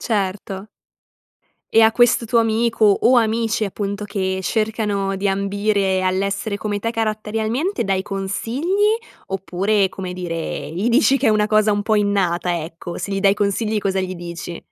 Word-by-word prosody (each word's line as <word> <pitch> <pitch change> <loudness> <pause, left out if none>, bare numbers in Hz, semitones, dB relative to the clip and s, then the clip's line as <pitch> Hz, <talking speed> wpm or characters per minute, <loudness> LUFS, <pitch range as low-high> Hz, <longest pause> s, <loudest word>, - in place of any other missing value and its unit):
Certo. 200 -1 -3 1.0
E 225 - +6
a 220 0 +6
questo 240 -1 +3
tuo 230 +1 +2
amico, 225 0 +2 0.2
o 255 +1 +5
amici 225 -1 0
appunto, 200 +1 -4
che 190 -2 -2
cercano 210 -2 -1
di 200 +1 0
ambire 200 0 0
all'essere 200 +2 -1
come 205 -1 -3
te 230 +3 -2
caratterialmente 225 - -1
dai 195 -1 0
consigli? 255 - 0 0.3
Oppure, 195 +1 0
come 185 -1 -6
dire, 165 -4 -4
gli 195 +7 -1
dici 270 +2 +4
che - - 0
è - - +6
una 210 -1 +3
cosa 215 0 +3
un 205 0 +1
po' 220 0 +1
innata, 180 -4 +1
ecco. 170 +1 -8
Se 200 - -4
gli 195 - -1
dai 195 0 +4
consigli 210 +2 0
cosa 195 -1 0
gli 185 0 -3
dici? 170 0 -7
205 Hz, 160 wpm, -20 LUFS, 190-220 Hz, 1.0 s, E